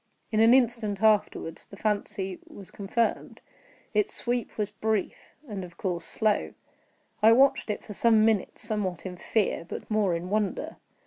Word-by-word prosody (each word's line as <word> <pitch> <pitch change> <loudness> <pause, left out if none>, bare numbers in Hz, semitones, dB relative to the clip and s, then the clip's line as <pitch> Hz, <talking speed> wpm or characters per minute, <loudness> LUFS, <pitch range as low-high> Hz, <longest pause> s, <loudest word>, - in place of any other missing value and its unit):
In 215 - +1
an 225 +1 +6
instant 230 -5 +2
afterward 210 -6 +2
the 200 - -11
fancy 205 -3 -2
was 195 -2 -10
confirmed. 210 +3 -2 0.5
Its 210 -1 +2
sweep 240 0 -3
was 210 -1 -1
brief, 215 -1 -3
and 200 -4 -5
of 175 -1 -11
course 175 -3 -3
slow. 215 -2 0 0.7
I 220 +2 +7
watched 265 -1 +4
it 210 - -3
for 210 - -8
some 220 +1 +4
minutes, 220 -3 0
somewhat 205 -6 -2
in 185 -1 -5
fear, 200 +1 0
but 170 - -8
more 205 -5 +2
in 175 +3 -5
wonder. 210 -1 -1
210 Hz, 155 wpm, -27 LUFS, 195-220 Hz, 0.7 s, I